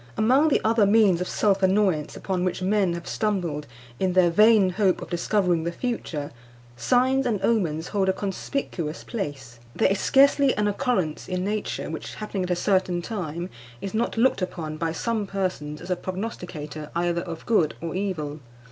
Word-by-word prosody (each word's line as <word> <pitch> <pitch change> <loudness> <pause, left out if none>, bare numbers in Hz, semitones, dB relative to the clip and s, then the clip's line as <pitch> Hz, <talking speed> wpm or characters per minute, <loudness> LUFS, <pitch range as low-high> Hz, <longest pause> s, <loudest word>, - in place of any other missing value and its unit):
Among 260 +8 +4
the 300 - +3
other 220 -2 +3
means 200 -4 +4
of 180 - -2
self 200 -2 +2
annoyance 190 -5 +2
upon 185 -2 -2
which 185 0 -1
men 195 -2 +2
have 170 - -7
stumbled, 175 -9 -1 0.3
in 185 -1 +1
their 180 -2 +4
vain 210 0 +5
hope 190 0 +2
of - - -9
discovering 175 -1 +1
the 170 - -1
future, 170 - -4 0.4
signs 255 - +2
and 215 -4 0
omens 175 -8 +1
hold 195 -2 +1
a - - +6
conspicuous 190 - -4
place. 140 - -6 0.2
There - - +3
is 200 - 0
scarcely 280 0 +4
an 210 0 +2
occurrence 205 - -1
in 180 0 -1
nature 210 +1 -3
which, - - -6
happening 210 -2 -4
at 180 - -2
a 180 - +2
certain 180 -1 +1
time, 175 -5 -4 0.3
is 195 - -5
not 230 +1 -1
looked 235 -3 +3
upon 165 -4 -4
by 165 0 -1
some 215 +4 -2
persons 180 -7 -3
as 175 +2 -6
a - - +3
prognosticator 175 -6 -6
either 170 0 0
of 170 -2 -7
good 175 -10 +2
or 165 -1 -4
evil. 170 -6 -3
185 Hz, 175 wpm, -25 LUFS, 170-210 Hz, 0.4 s, a